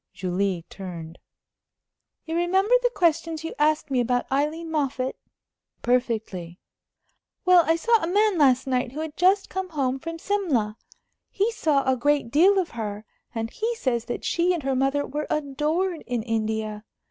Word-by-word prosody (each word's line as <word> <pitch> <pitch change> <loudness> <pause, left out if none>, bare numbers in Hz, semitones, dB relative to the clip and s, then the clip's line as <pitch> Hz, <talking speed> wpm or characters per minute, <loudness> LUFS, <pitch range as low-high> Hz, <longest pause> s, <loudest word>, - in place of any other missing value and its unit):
Julie 185 -1 -1
turned. 170 -4 -8 1.1
"You 325 - -3
remember 380 +6 +2
the - - +3
questions 330 -6 0
you 325 - -4
asked 300 -1 +2
me 260 - +2
about 245 0 +1
Aileen 305 +4 -1
Moffatt?" 270 -4 -1 0.7
"Perfectly." 220 -8 -1 0.9
"Well, 365 -1 +7
I 325 - +4
saw 455 +6 +3
a - - -1
man 410 0 +2
last 260 -3 +4
night 250 -1 -1
who 305 - -4
had 315 -1 -5
just 380 +2 +3
come 380 -1 -4
home 270 -4 -1
from 330 +3 -6
Simla. 320 - 0 0.5
He 410 +4 0
saw 300 -10 +1
a 260 - +4
great 285 -1 +1
deal 370 +8 +5
of 370 -3 0
her, 215 -2 -5 0.3
and 225 0 -3
he 465 +2 -2
says 240 - -1
that 240 - -5
she 355 +1 +2
and 325 - -5
her 270 0 0
mother 270 +2 +1
were 295 +2 -4
adored 305 +5 -1
in 245 -3 -2
India. 220 -2 -2
285 Hz, 160 wpm, -25 LUFS, 235-340 Hz, 1.1 s, Well